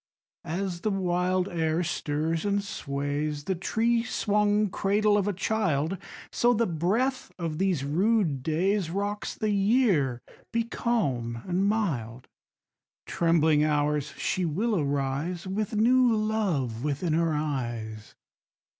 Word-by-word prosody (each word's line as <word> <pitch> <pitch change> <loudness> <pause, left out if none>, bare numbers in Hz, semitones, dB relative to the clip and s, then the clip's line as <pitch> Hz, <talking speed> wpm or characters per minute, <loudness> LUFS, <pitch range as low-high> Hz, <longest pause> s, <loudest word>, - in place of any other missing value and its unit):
3. - - -6
As 180 -1 -3
the 215 - 0
wild 185 -1 0
air 165 -1 0
stirs 160 0 -1
and 200 -1 0
sways 145 -4 -3
The 190 - -1
tree 230 +6 +1
swung 210 -3 +1
cradle 205 +2 +2
of 205 -1 +1
a - - +2
child, 185 -5 0 0.4
So 240 0 +3
the 230 +2 +2
breath 210 - 0
of 165 -4 -3
these 185 -7 +1
rude 170 - +1
days 180 +6 +1
_15 170 - -6
Rocks 205 +1 -2
the 215 -1 -1
Year: 195 - +2 0.3
be 230 0 +1
calm 135 - -1
and 185 +2 +1
mild, 135 - -2 0.8
Trembling 160 -3 +3
Hours, 150 -1 0
she 185 - -1
will 205 +8 0
arise 145 +3 -1
With 210 +3 -2
new 245 +3 +4
love 190 - -1
within 150 +3 -1
her 165 0 +2
eyes. 120 -8 -4
175 Hz, 130 wpm, -27 LUFS, 150-210 Hz, 0.8 s, new